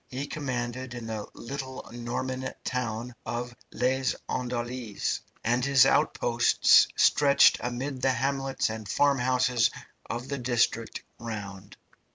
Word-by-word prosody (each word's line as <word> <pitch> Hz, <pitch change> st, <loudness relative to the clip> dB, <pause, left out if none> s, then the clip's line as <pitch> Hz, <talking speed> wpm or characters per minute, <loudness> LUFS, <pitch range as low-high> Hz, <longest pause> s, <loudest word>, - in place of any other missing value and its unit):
He 130 Hz, +3 st, -4 dB
commanded 130 Hz, -3 st, -4 dB
in 120 Hz, -2 st, -6 dB
the 110 Hz, -2 st, -5 dB
little 130 Hz, +1 st, -6 dB
Norman 130 Hz, +2 st, -3 dB
town 120 Hz, -1 st, -3 dB
of 120 Hz, +1 st, -4 dB, 0.2 s
Les 130 Hz, +1 st, 0 dB
Andelys, 120 Hz, -3 st, -3 dB, 0.2 s
and 120 Hz, +2 st, +1 dB
his 140 Hz, -1 st, +6 dB
outposts 120 Hz, -4 st, +4 dB
stretched 140 Hz, -1 st, +5 dB
amid 130 Hz, +2 st, -4 dB
the 135 Hz, 0 st, +3 dB
hamlets 135 Hz, 0 st, -1 dB
and 110 Hz, -2 st, -7 dB
farmhouses 125 Hz, -2 st, +2 dB, 0.4 s
of 120 Hz, +3 st, -4 dB
the 140 Hz, 0 st, -3 dB
district 120 Hz, -2 st, 0 dB, 0.2 s
round. 100 Hz, -4 st, -7 dB
125 Hz, 115 wpm, -28 LUFS, 120-130 Hz, 0.4 s, his